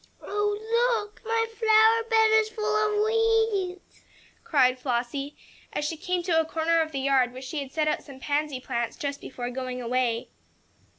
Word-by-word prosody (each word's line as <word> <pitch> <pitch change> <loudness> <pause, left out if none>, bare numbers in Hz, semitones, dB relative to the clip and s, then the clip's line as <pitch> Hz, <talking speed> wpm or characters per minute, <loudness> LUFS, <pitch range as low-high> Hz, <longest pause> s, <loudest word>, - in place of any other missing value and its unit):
"Oh, 435 +3 0
look! 420 - -24
My 455 0 +1
flower 450 0 +4
bed 445 -1 +4
is 435 0 -1
full 435 -1 -5
of 425 0 +2
weeds!" 445 -5 0 0.4
cried 260 - +3
Flossie, 255 +3 -3 0.4
as 295 - -2
she 325 - -2
came 360 +1 -2
to 335 -2 +2
a - - +3
corner 325 +1 +1
of 315 -1 -2
the 275 -2 -3
yard 265 -3 +2
where 255 - -8
she 265 +4 -5
had 270 -1 -8
set 310 0 0
out 305 - 0
some 275 -3 -13
pansy 290 -1 -1
plants 235 -2 -3
just 285 -4 -4
before 245 -1 -6
going 255 0 -4
away. 240 -1 -1
325 Hz, 175 wpm, -26 LUFS, 265-435 Hz, 0.4 s, flower